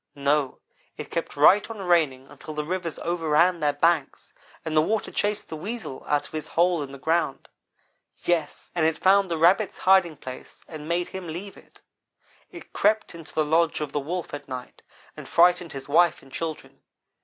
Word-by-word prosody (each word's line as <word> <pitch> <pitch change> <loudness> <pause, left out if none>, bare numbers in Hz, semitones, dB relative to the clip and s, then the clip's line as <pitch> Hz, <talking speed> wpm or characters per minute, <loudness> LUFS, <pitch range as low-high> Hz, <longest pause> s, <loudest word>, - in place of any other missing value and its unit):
No, 140 -1 0 0.4
it - - -8
kept 165 - -3
right 185 +10 +5
on 225 - -7
raining 165 -9 +1
until 155 +2 -10
the 150 - -2
rivers 170 0 -3
overran 170 +1 +2
their 150 -2 +2
banks, 160 -1 0 0.3
and 160 -1 -3
the 155 - +6
water 210 +6 -1
chased 210 0 -1
the - - -5
Weasel 200 - -6
out 145 -1 +1
of - - -13
his 155 -1 -5
hole 175 -1 +2
in 140 -1 -6
the 140 - -9
ground. 160 -1 -1 0.7
Yes, 165 -4 -2
and 170 - 0
it 160 0 +2
found 195 0 +4
the 165 - -1
Rabbit's 180 +6 +3
hiding 185 -5 +3
place 130 0 -10
and 155 -1 -9
made 175 +1 0
him 190 -2 -7
leave 180 +5 -7
it. - - -20 0.7
It - - -12
crept 215 -3 +1
into 165 -2 -12
the 155 - +2
lodge 165 +1 +2
of 150 -2 -4
the 145 - -1
Wolf 170 +5 -5
at 145 0 -7
night 125 -1 -8 0.3
and - - -10
frightened 175 0 +4
his 135 -1 -7
wife 165 +3 +3
and 135 - -18
children. 160 +1 -6
165 Hz, 190 wpm, -25 LUFS, 150-180 Hz, 0.7 s, the